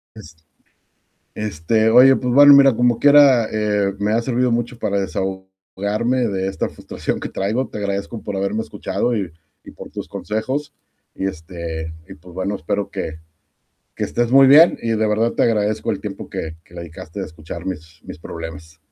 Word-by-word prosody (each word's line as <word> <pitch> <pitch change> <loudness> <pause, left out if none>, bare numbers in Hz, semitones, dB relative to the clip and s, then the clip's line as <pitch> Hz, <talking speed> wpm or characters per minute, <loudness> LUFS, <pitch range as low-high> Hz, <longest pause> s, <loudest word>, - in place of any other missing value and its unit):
es 80 +1 -13 1.0
este, 105 +2 0
oye, 130 +3 +7
pues 125 -1 -2
bueno, 145 +1 +9
mira, 140 -1 +7
como 120 0 +2
quiera, 140 -5 +6
eh, 105 -2 0
me 105 +1 0
ha 115 - +2
servido 125 0 0
mucho 120 +1 -2
para 100 0 -1
desahogarme 95 +6 -3
de 95 -2 -2
esta 95 - -3
frustración - - -5
que - - -3
traigo, 110 +7 -2
te - - -8
agradezco 100 +2 -4
por 105 - -5
haberme 100 +3 -1
escuchado, 120 +1 -2
y 95 -6 -3 0.3
y - - -12
por - - -11
tus - - -7
consejos, 130 +7 -4 0.4
y 95 - -3
este, 80 -2 -6 0.2
y - - -8
pues, 90 +3 -16
bueno, 95 +2 -2
espero 100 +3 -3
que 80 0 -5 0.8
que - - -3
estés 120 -1 -1
muy 135 0 +7
bien 150 +6 +7
y 115 - -4
de 110 -1 +1
verdad 110 +2 +1
te - - -1
agradezco 110 -2 0
el - - -3
tiempo - - -7
que 80 0 -5
que 85 - -19
dedicaste 85 +1 -9
a - - -3
escuchar 80 +2 -9
mis 80 -3 -7
mis - - -10
problemas. 80 -1 -9
105 Hz, 180 wpm, -20 LUFS, 90-120 Hz, 1.0 s, bueno